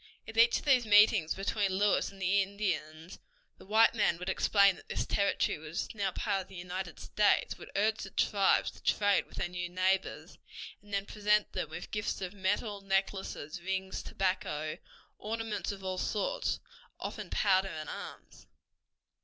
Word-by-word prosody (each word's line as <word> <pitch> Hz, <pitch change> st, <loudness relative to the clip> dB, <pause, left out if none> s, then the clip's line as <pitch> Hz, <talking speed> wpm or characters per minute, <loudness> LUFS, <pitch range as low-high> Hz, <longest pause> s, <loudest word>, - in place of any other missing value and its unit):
At 220 Hz, -, -8 dB
each 230 Hz, +1 st, +5 dB
of -, -, -8 dB
these 260 Hz, -4 st, +5 dB
meetings 205 Hz, -5 st, +5 dB
between 195 Hz, 0 st, 0 dB
Lewis 205 Hz, 0 st, +2 dB
and 195 Hz, -, -15 dB
the 190 Hz, +2 st, +3 dB
Indians 180 Hz, -4 st, -3 dB, 0.4 s
the -, -, -15 dB
white 220 Hz, +2 st, +5 dB
man 210 Hz, -6 st, +2 dB
would 180 Hz, -, -5 dB
explain 200 Hz, -2 st, +4 dB
that -, -, -17 dB
this -, -, -1 dB
territory 200 Hz, -6 st, +1 dB
was 160 Hz, +2 st, -5 dB
now 200 Hz, -3 st, -1 dB
part 195 Hz, +1 st, -1 dB
of 185 Hz, -, -12 dB
the 195 Hz, -, -13 dB
United 180 Hz, 0 st, -5 dB
States, 210 Hz, -1 st, +2 dB
would -, -, -10 dB
urge 215 Hz, +2 st, +2 dB
the 195 Hz, -, -6 dB
tribes 195 Hz, 0 st, +2 dB
to -, -, -17 dB
trade 205 Hz, -2 st, +2 dB
with -, -, -14 dB
their 175 Hz, -, -1 dB
new 175 Hz, 0 st, -4 dB
neighbors, 185 Hz, +1 st, -1 dB, 0.4 s
and 205 Hz, -, -18 dB
then 200 Hz, 0 st, -1 dB
present 210 Hz, 0 st, +1 dB
them 155 Hz, -, -3 dB
with 165 Hz, +2 st, -8 dB
gifts 210 Hz, -1 st, -2 dB
of 185 Hz, 0 st, -5 dB
medals, 205 Hz, +1 st, -1 dB
necklaces, 195 Hz, -5 st, -2 dB
rings, 190 Hz, +1 st, -3 dB
tobacco, 155 Hz, -5 st, -2 dB, 0.4 s
ornaments 225 Hz, -1 st, -3 dB
of 195 Hz, -1 st, -9 dB
all 185 Hz, -1 st, -3 dB
sorts, -, -, -1 dB
and -, -, -18 dB, 0.4 s
often -, -, -5 dB
powder 190 Hz, -1 st, +2 dB
and 155 Hz, -4 st, -6 dB
arms. -, -, -9 dB
195 Hz, 170 wpm, -31 LUFS, 185-210 Hz, 0.4 s, each